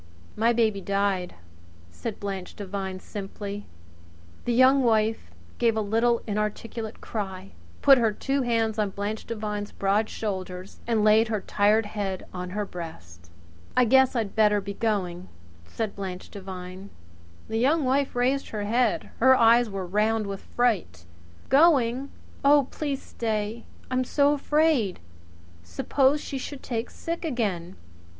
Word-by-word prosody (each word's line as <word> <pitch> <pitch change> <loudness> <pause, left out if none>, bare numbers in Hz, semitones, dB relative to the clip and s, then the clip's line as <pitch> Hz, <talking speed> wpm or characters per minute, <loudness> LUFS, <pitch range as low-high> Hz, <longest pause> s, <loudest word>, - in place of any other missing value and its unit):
"My 230 +2 +3
baby 220 -4 +1
died," 195 -2 -1 0.6
said 225 - -6
Blanche 195 -2 -5
Devine 190 -2 -5
simply. 200 +1 -7 0.8
The 240 - 0
Young 260 +3 +6
Wife 220 - +1 0.3
gave 230 -2 +2
a - - +2
little 230 +3 +1
inarticulate 215 +1 -3
cry, 195 -3 -5 0.3
put 275 -2 +8
her 225 -2 +3
two 270 +6 -1
hands 225 -3 0
on 210 -2 +1
Blanche 205 +3 -4
Devine's 210 -2 -4
broad 205 +3 +1
shoulders 185 -3 -5
and 225 -3 +2
laid 215 +2 +5
her 215 -1 -1
tired 210 +3 +2
head 200 -3 -4
on 180 0 -5
her 205 +3 -2
breast. 90 - -9 0.5
"I 250 - +6
guess 265 +2 +4
I'd 220 -4 -1
better 210 -1 +4
be 200 0 -5
going," 185 -5 -2 0.4
said 220 - -4
Blanche 185 -2 -6
Devine. 185 -1 -8 0.6
The 225 - -1
Young 285 +4 +3
Wife 270 +1 +1
raised 260 +3 +1
her 210 -2 -3
head. 230 +2 +1
Her 260 +2 +7
eyes 235 0 +5
were 195 -2 -4
round 215 +4 +1
with 195 -1 -5
fright. 185 - -1 0.4
"Going! 270 -3 +4 0.3
Oh, 285 -1 +5
please 285 -3 -3
stay! 220 0 -3 0.3
I'm 255 0 +2
so 285 +3 +3
afraid. 295 - +2 0.6
Suppose 265 - +1
she 275 -2 -5
should 275 +1 -7
take 230 -2 -3
sick 335 +1 -5
again! 200 - -2
215 Hz, 140 wpm, -26 LUFS, 195-245 Hz, 0.8 s, put